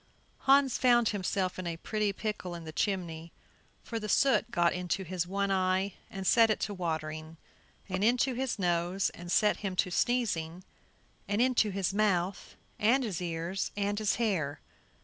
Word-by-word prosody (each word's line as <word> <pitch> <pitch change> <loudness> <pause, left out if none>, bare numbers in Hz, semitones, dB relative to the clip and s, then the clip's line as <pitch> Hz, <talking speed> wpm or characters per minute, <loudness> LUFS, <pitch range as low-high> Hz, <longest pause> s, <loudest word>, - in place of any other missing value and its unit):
Hans 270 -1 +5
found 240 -3 +4
himself 190 -2 -1
in 185 - -4
a 165 -1 -3
pretty 210 +3 -1
pickle 195 -3 -4
in 170 - -8
the 160 - -7
chimney, 170 -3 -2 0.5
for 230 - -4
the 210 -1 -5
soot 255 0 +3
got 175 -6 +2
into 180 +1 -2
his 180 -1 -3
one 200 +1 -1
eye 190 +1 +1 0.2
and 195 -1 -6
set 225 +4 +5
it 215 - +1
to 205 - -2
watering, 160 -2 -4 0.5
and 185 0 -2
into 250 +3 +3
his 255 0 -2
nose 175 0 0
and 175 0 -8
set 210 +2 +3
him 195 -3 -4
to 180 - +1
sneezing, 185 -8 0 0.6
and 205 +1 0
into 245 -3 +3
his 195 -1 -1
mouth 195 -3 0 0.2
and 245 +6 +3
his 200 -7 -3
ears 170 +2 -3
and 205 +1 0
his 215 -1 +1
hair. 185 -11 -1
195 Hz, 170 wpm, -30 LUFS, 175-215 Hz, 0.6 s, Hans